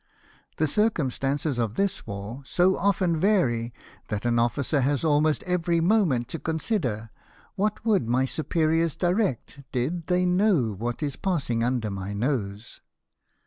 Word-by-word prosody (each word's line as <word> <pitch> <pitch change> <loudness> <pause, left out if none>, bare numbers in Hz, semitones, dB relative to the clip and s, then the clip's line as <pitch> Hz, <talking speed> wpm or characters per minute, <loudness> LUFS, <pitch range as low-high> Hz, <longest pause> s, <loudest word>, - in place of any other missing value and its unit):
The 155 - +2
circumstances 145 - 0
of 115 -2 -1
this 200 -3 -1
war 100 +5 -6
so 180 +7 +2
often 185 -4 +1
vary 130 - +2 0.4
that 105 +1 -4
an 120 -1 +2
officer 140 +4 +1
has 140 +3 +1
almost 155 0 +2
every 175 -2 +1
moment 165 - +2
to 165 - -4
consider 150 - -2 0.4
what 210 +2 -2
would 200 - +2
my 130 +2 +2
superiors 160 +2 0
direct 175 - -1
did 155 +7 -2
they 180 0 +2
know 180 - +2
what 120 +8 -4
is 145 -2 -3
passing 140 - -1
under 120 -3 0
my 100 +1 -5
nose. 105 -2 -3
145 Hz, 140 wpm, -26 LUFS, 120-180 Hz, 0.4 s, The